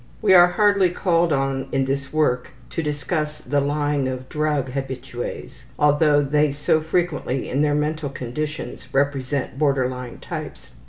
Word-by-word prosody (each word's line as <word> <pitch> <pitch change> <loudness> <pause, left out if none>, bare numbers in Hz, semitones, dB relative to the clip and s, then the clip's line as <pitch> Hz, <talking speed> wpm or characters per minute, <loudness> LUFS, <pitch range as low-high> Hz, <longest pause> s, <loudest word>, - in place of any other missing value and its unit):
We 205 -3 +4
are 175 -1 +9
hardly 200 0 +3
called 175 -2 +1
on 135 -1 0
in 135 -1 +1
this 140 +1 -2
work 135 -5 +1 0.2
to 165 - -2
discuss 150 +1 -2
the 145 0 -1
lying 145 -1 0
of 130 0 -5
drug 150 -3 0
habitues, 130 -2 -6
although 145 0 +4
they 150 +1 +2
so 145 +2 +1
frequently 160 -5 -1
in 140 - 0
their 150 -1 +2
mental 150 0 -1
conditions 135 +2 -5
represent 140 -1 0
border 140 -4 +2
line 125 -1 -7
types. - - -7
145 Hz, 150 wpm, -22 LUFS, 135-155 Hz, 0.2 s, are